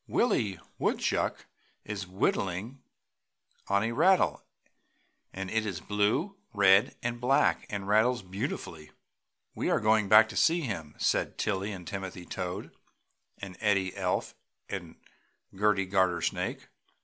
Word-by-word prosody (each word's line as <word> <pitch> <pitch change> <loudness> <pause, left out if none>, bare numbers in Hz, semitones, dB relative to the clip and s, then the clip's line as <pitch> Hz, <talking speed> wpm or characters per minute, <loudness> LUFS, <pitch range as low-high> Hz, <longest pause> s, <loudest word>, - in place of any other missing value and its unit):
"Willie 110 - +1 0.2
Woodchuck - - 0 0.4
is 100 -3 -5
whittling 95 +6 -1 0.9
on 100 +1 +2
a 115 - -1
rattle 185 +10 +3 0.9
and 95 0 -5
it 110 0 +1
is 100 -6 -4
blue, 105 - 0 0.2
red 95 0 +5
and 120 0 -3
black 135 +3 +2
and 100 -2 -4
rattles 110 +3 +3
beautifully." 90 -4 -5 0.6
"We - - -2
are - - +3
going 110 -1 +2
back 110 +1 +8
to - - -8
see 170 +1 +3
him!" 85 - -5
said - - 0
Tilly 100 0 -1
and 90 -3 -8
Timothy 95 -2 -6
Toad 90 0 -5 0.6
and 95 -2 -8
Eddie 100 -4 +1
Elf - - -1 0.3
and 85 -4 -6 0.6
Gerty 100 -1 +2
Gartersnake. 95 -2 0
100 Hz, 125 wpm, -29 LUFS, 95-110 Hz, 0.9 s, back